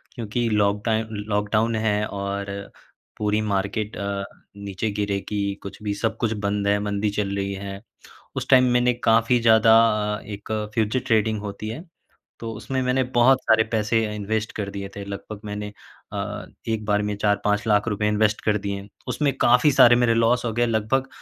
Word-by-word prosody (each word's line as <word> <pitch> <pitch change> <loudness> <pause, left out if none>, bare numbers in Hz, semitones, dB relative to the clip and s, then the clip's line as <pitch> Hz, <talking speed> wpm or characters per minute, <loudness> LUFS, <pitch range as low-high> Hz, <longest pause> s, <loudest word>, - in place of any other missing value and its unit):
क्योंकि 120 0 -2
लॉकटाइन 105 +1 +1 0.2
लॉकडाउन 105 +2 +1
है 105 -1 +1
और 100 0 -4 0.7
पूरी 105 0 0
मार्केट 105 +1 -2
अ, 100 0 -3 0.3
नीचे 100 +1 -3
गिरेगी, 100 0 -2
कुछ 100 - -9
भी 105 -1 -1
सब 110 +2 -2
कुछ 115 -2 0
बंद 100 -1 -2
है 100 0 +3
मंदी 105 0 -1
चल 100 -1 -2
रही 100 0 -2
है। 100 0 -7 0.6
उस - - -3
टाइम 130 -1 +7
मैंने 125 0 +3
काफ़ी 115 +2 +4
ज़्यादा 110 0 +6 0.4
अ, - - -9
एक 105 +1 -7 0.2
फ़्यूचर 110 +2 +1
ट्रेडिंग 110 -2 +1
होती 105 +1 -6
है, 120 +10 -6 0.6
तो 115 -1 -5
उसमें 115 +5 -3
मैंने 130 +1 +1
बहुत 125 +2 +5
सारे 110 0 +4
पैसे 110 +1 +2
इन्वेस्ट 105 +1 -2
कर 105 -2 -3
दिए 100 0 -6
थे। 100 - -5
लगभग 100 +1 -7
मैंने 105 0 -5 0.4
अ, - - -4 0.2
एक 110 -1 -1
बार 105 -1 +2
में 105 0 -2
4-5 105 +1 0
लाख 105 0 +2
रुपए 105 -1 0
इन्वेस्ट 105 0 +1
कर 105 -1 +2
दिए। 100 0 -5 0.2
उसमें 145 -2 +1
क़ाफ़ी 125 +5 +5
सारे 120 -2 +7
मेरे 120 -1 +3
लॉस 115 +2 +2
हो 115 - -1
गए 120 +1 +2
लगभग 115 +4 0
105 Hz, 175 wpm, -23 LUFS, 100-115 Hz, 0.7 s, टाइम